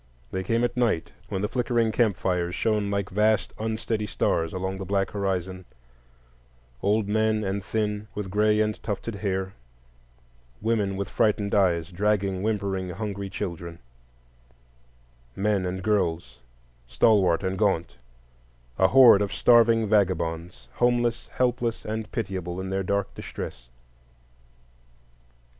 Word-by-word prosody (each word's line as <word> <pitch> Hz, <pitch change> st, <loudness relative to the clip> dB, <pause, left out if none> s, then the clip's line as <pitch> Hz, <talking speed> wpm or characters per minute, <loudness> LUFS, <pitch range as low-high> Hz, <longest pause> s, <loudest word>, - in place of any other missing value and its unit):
They 95 Hz, -, -2 dB
came 115 Hz, +4 st, 0 dB
at 120 Hz, -, 0 dB
night, 115 Hz, -9 st, 0 dB, 0.2 s
when 95 Hz, -, -2 dB
the -, -, +1 dB
flickering 120 Hz, -1 st, 0 dB
camp 110 Hz, -5 st, +2 dB
fires 90 Hz, -1 st, -1 dB
shone 105 Hz, -2 st, 0 dB
like 100 Hz, -1 st, -2 dB
vast 105 Hz, 0 st, +2 dB
unsteady 110 Hz, -1 st, -2 dB
stars 80 Hz, -4 st, 0 dB
along 95 Hz, +1 st, -3 dB
the -, -, -4 dB
black 95 Hz, +1 st, 0 dB
horizon: 95 Hz, -2 st, -2 dB, 1.2 s
old 105 Hz, +1 st, +1 dB
men 110 Hz, +1 st, +1 dB
and 95 Hz, 0 st, -2 dB
thin, 105 Hz, -1 st, -2 dB
with 100 Hz, -3 st, -4 dB
gray 105 Hz, +1 st, +3 dB
and 105 Hz, 0 st, -1 dB
tufted 110 Hz, +2 st, -4 dB
hair; 95 Hz, -1 st, -2 dB, 1.1 s
women 105 Hz, -3 st, 0 dB
with 100 Hz, -, -2 dB
frightened 105 Hz, -2 st, +1 dB
eyes, 90 Hz, -3 st, +2 dB
dragging 100 Hz, 0 st, 0 dB
whimpering 100 Hz, -3 st, -1 dB
hungry 100 Hz, +1 st, -4 dB
children; 85 Hz, -3 st, -5 dB, 1.6 s
men 100 Hz, -2 st, 0 dB
and 95 Hz, +1 st, -4 dB
girls, 85 Hz, -, -1 dB, 0.5 s
stalwart 90 Hz, -, +3 dB
and 95 Hz, 0 st, -2 dB
gaunt,—a -, -, -3 dB
horde 120 Hz, -5 st, +7 dB
of 100 Hz, -, -1 dB
starving 115 Hz, -2 st, +4 dB
vagabonds, 85 Hz, -, 0 dB
homeless, 120 Hz, -1 st, +1 dB
helpless, 120 Hz, -2 st, -1 dB
and 110 Hz, 0 st, -4 dB
pitiable, 95 Hz, -5 st, -4 dB
in 95 Hz, 0 st, -4 dB
their 95 Hz, 0 st, 0 dB
dark 100 Hz, +1 st, -1 dB
distress. 60 Hz, -1 st, -8 dB
100 Hz, 125 wpm, -26 LUFS, 90-110 Hz, 1.6 s, horde